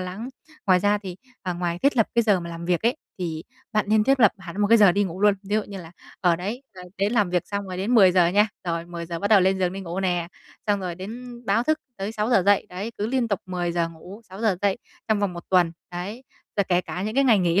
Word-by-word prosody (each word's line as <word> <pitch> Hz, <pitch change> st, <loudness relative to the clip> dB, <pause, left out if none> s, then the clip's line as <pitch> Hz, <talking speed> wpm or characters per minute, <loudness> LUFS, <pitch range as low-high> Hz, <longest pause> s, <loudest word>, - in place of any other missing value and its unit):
lắng. 185 Hz, +6 st, -5 dB, 0.4 s
Ngoài 185 Hz, -2 st, +5 dB
ra 205 Hz, +1 st, +2 dB
thì 185 Hz, -3 st, -8 dB, 0.3 s
ờ, 180 Hz, -2 st, -2 dB
ngoài 175 Hz, -1 st, -2 dB
thiết 275 Hz, +5 st, +2 dB
lập 225 Hz, -, +4 dB
cái 235 Hz, -, +4 dB
giờ 205 Hz, -4 st, +3 dB
mà 170 Hz, 0 st, -7 dB
làm 170 Hz, 0 st, -7 dB
việc 175 Hz, +1 st, 0 dB
ấy, 240 Hz, +6 st, +2 dB, 0.2 s
thì 165 Hz, -2 st, -4 dB, 0.3 s
bạn 215 Hz, -1 st, +2 dB
nên 215 Hz, 0 st, +4 dB
thiết 270 Hz, +1 st, +3 dB
lập 215 Hz, -, +6 dB
hẳn 190 Hz, +2 st, -7 dB
một 205 Hz, -, +4 dB
cái 230 Hz, +1 st, +6 dB
giờ 205 Hz, -4 st, +7 dB
đi 205 Hz, +2 st, +2 dB
ngủ 185 Hz, 0 st, -6 dB
luôn. 205 Hz, -1 st, +5 dB
Ví 205 Hz, +1 st, -3 dB
dụ 215 Hz, -, +1 dB
như 200 Hz, -1 st, -8 dB
là, 165 Hz, -, -12 dB, 0.3 s
ờ, 175 Hz, -3 st, +3 dB
đấy 210 Hz, +9 st, -5 dB
th -, -, -14 dB, 0.2 s
đến 200 Hz, +3 st, +1 dB
làm 210 Hz, -6 st, +2 dB
việc 180 Hz, -1 st, 0 dB
xong 200 Hz, 0 st, -3 dB
rồi 185 Hz, -1 st, -6 dB
đến 200 Hz, +7 st, 0 dB
10:00 185 Hz, -5 st, +6 dB
nha, 205 Hz, +4 st, +3 dB, 0.2 s
rồi 170 Hz, -1 st, -2 dB
10:00 170 Hz, -1 st, -5 dB
bắt 200 Hz, -, -1 dB
đầu 210 Hz, -2 st, +6 dB
lên 190 Hz, +1 st, +2 dB
giường 180 Hz, -1 st, 0 dB
đi 195 Hz, -, -5 dB
ngủ 180 Hz, 0 st, -4 dB
nè, 175 Hz, -3 st, 0 dB, 0.4 s
xong 205 Hz, -1 st, +1 dB
rồi 180 Hz, -2 st, -4 dB
đến 235 Hz, +6 st, -8 dB
báo 210 Hz, +4 st, +2 dB
thức 310 Hz, +3 st, +1 dB, 0.2 s
tới 195 Hz, +3 st, -4 dB
6:00 215 Hz, -1 st, +2 dB
dậy, 205 Hz, -1 st, +4 dB
đấy, 195 Hz, +6 st, -5 dB
cứ 210 Hz, -, -1 dB
liên 245 Hz, 0 st, 0 dB
tục 200 Hz, -3 st, -1 dB
10:00 175 Hz, -2 st, -1 dB
ngủ, 180 Hz, +6 st, -12 dB
6:00 195 Hz, +1 st, 0 dB
dậy 200 Hz, +1 st, +1 dB, 0.3 s
trong 215 Hz, -1 st, +2 dB
vòng 200 Hz, -3 st, 0 dB
1 170 Hz, -1 st, -8 dB
tuần, 175 Hz, -3 st, +4 dB, 0.2 s
đấy. 190 Hz, +8 st, -6 dB, 0.3 s
Rồi 200 Hz, -, +3 dB
kể 180 Hz, -1 st, +3 dB
cả 180 Hz, 0 st, -5 dB
những 215 Hz, +2 st, -3 dB
cái 275 Hz, +1 st, +3 dB
ngày 230 Hz, -5 st, +5 dB
nghỉ 180 Hz, +1 st, +2 dB
195 Hz, 265 wpm, -24 LUFS, 180-215 Hz, 0.4 s, giờ